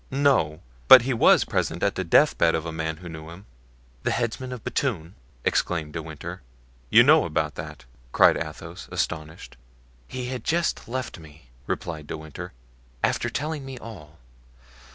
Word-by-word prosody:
"No; 130 Hz, -, +2 dB, 0.3 s
but 125 Hz, -, +10 dB
he 130 Hz, +1 st, 0 dB
was 115 Hz, -, +5 dB
present 85 Hz, +1 st, -2 dB
at 100 Hz, -, +2 dB
the 95 Hz, -, -2 dB
deathbed 85 Hz, -, +4 dB
of 80 Hz, 0 st, -3 dB
a 80 Hz, -, -4 dB
man 80 Hz, 0 st, -3 dB
who 90 Hz, +1 st, -10 dB
knew 80 Hz, -1 st, -8 dB
him." 90 Hz, +5 st, -12 dB, 0.6 s
"The -, -, -1 dB
headsman 125 Hz, +2 st, -2 dB
of 125 Hz, -4 st, -7 dB
Bethune?" 95 Hz, -, -2 dB, 0.3 s
exclaimed 80 Hz, -4 st, 0 dB
De 80 Hz, -, -3 dB
Winter. 80 Hz, +3 st, -8 dB, 0.5 s
"You -, -, +8 dB
know -, -, +6 dB
about -, -, -1 dB
that?" -, -, -8 dB, 0.3 s
cried -, -, +6 dB
Athos, 75 Hz, -2 st, -7 dB
astonished. 80 Hz, -5 st, -4 dB, 0.5 s
"He 125 Hz, -1 st, -5 dB
has 130 Hz, -1 st, -3 dB
just 170 Hz, +1 st, -1 dB
left 125 Hz, -5 st, -4 dB
me," 75 Hz, -5 st, -16 dB, 0.2 s
replied 80 Hz, -3 st, -4 dB
De -, -, -5 dB
Winter, 80 Hz, -1 st, -8 dB, 0.5 s
"after -, -, +1 dB
telling 150 Hz, +1 st, -3 dB
me 135 Hz, -1 st, -8 dB
all. 85 Hz, -11 st, -11 dB
85 Hz, 160 wpm, -25 LUFS, 80-125 Hz, 0.6 s, but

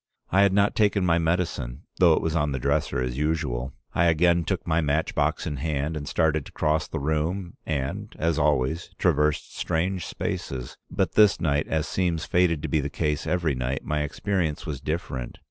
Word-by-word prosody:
I 95 Hz, -, +5 dB
had 100 Hz, -1 st, +5 dB
not 100 Hz, +1 st, +3 dB
taken 100 Hz, -3 st, +2 dB
my 85 Hz, -1 st, +3 dB
medicine, 80 Hz, -5 st, -1 dB
though 85 Hz, -3 st, +6 dB
it -, -, -1 dB
was 80 Hz, 0 st, -1 dB
on 75 Hz, -3 st, +1 dB
the -, -, -1 dB
dresser 70 Hz, +2 st, 0 dB
as 65 Hz, +1 st, -2 dB
usual. 70 Hz, -5 st, -1 dB, 0.2 s
I 85 Hz, -, +3 dB
again 85 Hz, +1 st, +4 dB
took -, -, -2 dB
my 80 Hz, +1 st, +2 dB
match 75 Hz, +1 st, 0 dB
box 75 Hz, +3 st, 0 dB
in 75 Hz, -4 st, -3 dB
hand 75 Hz, +2 st, -2 dB
and 70 Hz, -2 st, -5 dB
started 80 Hz, -2 st, +1 dB
to -, -, -13 dB
cross 75 Hz, 0 st, 0 dB
the -, -, -4 dB
room, 80 Hz, +5 st, -1 dB
and, 70 Hz, -4 st, -3 dB
as 80 Hz, -1 st, +1 dB
always, 75 Hz, +2 st, +1 dB
traversed 75 Hz, -3 st, +1 dB
strange 90 Hz, +2 st, -1 dB
spaces, 65 Hz, -2 st, -4 dB
but -, -, 0 dB
this 105 Hz, -3 st, +5 dB
night, 75 Hz, -2 st, +1 dB
as 80 Hz, -1 st, -1 dB
seems 85 Hz, -3 st, 0 dB
fated 85 Hz, -4 st, +2 dB
to -, -, -1 dB
be 80 Hz, -, +1 dB
the 70 Hz, -, -3 dB
case 75 Hz, +1 st, -1 dB
every 85 Hz, -5 st, +1 dB
night, 65 Hz, +1 st, -3 dB
my 75 Hz, 0 st, 0 dB
experience 80 Hz, +1 st, -1 dB
was 70 Hz, -4 st, -4 dB
different. 75 Hz, -5 st, -4 dB
80 Hz, 195 wpm, -26 LUFS, 70-85 Hz, 0.2 s, though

